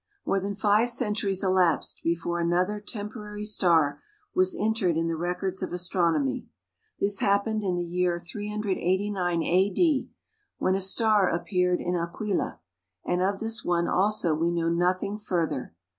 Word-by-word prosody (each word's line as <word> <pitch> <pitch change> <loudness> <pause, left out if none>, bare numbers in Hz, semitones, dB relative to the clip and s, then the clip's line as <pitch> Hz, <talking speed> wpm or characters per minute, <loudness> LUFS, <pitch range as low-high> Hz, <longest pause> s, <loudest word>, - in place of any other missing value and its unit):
More 195 - +1
than 200 +1 -4
five 210 +4 +3
centuries 210 -5 0
elapsed 185 -4 +2
before 170 +1 -1
another 180 +5 +1
temporary 210 0 -5
star 170 -8 +2 0.3
was 370 -1 +2
entered 205 -6 +1
in 165 0 0
the 165 - -1
records 180 +3 -2
of - - -3
astronomy. 170 -6 0 0.5
This 200 0 +1
happened 200 +2 +1
in 185 -3 -1
the 175 - -1
year 175 0 0
389 190 -2 -1
A.D., 205 - +2 0.5
when 185 - +1
a 190 - +1
star 205 0 +3
appeared 180 +1 0
in 180 +1 -1
Aquila; 175 +4 -2 0.5
and 180 0 0
of 195 +1 0
this 225 0 -2
one 170 -1 +1
also 195 -4 +2
we 165 +2 +1
know 170 -1 0
nothing 185 +4 0
further. 165 - -2
185 Hz, 145 wpm, -27 LUFS, 175-210 Hz, 0.5 s, five